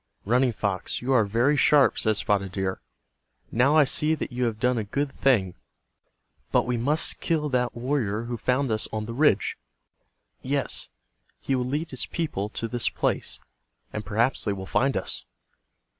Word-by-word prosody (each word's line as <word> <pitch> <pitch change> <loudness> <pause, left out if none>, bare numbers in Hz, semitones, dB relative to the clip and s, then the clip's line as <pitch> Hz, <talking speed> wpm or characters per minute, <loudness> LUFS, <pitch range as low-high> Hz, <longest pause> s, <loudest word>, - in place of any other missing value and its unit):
"Running 125 +4 +3
Fox, 100 -4 -2
you 135 +2 +1
are 115 -4 +4
very 120 +8 +2
sharp," 145 -1 +4
said 110 -2 +1
Spotted 100 -4 0
Deer. 95 0 -2 0.7
"Now 130 +6 +3
I 155 - +8
see 150 +3 +2
that 150 - -5
you 125 0 -1
have 110 -2 -2
done 125 0 +2
a - - -1
good 140 +7 -2
thing. 105 -10 +2 1.0
But - - +3
we 125 - 0
must 145 +7 0
kill 155 -3 0
that 125 -2 0
warrior 120 -4 -1
who 120 +1 -4
found 125 +3 0
us 110 0 0
on 110 -1 -3
the 115 - -6
ridge. 125 - +2 0.8
Yes, - - -1 0.5
he 135 - -2
will 125 -1 0
lead 150 +6 -2
his 130 - -3
people 125 - -3
to 115 - -4
this 120 0 -1
place, - - -2 0.5
and 105 - -3
perhaps 115 +5 +1
they 105 - 0
will 95 -1 -6
find 135 +7 +1
us." - - -4
120 Hz, 175 wpm, -26 LUFS, 110-135 Hz, 1.0 s, I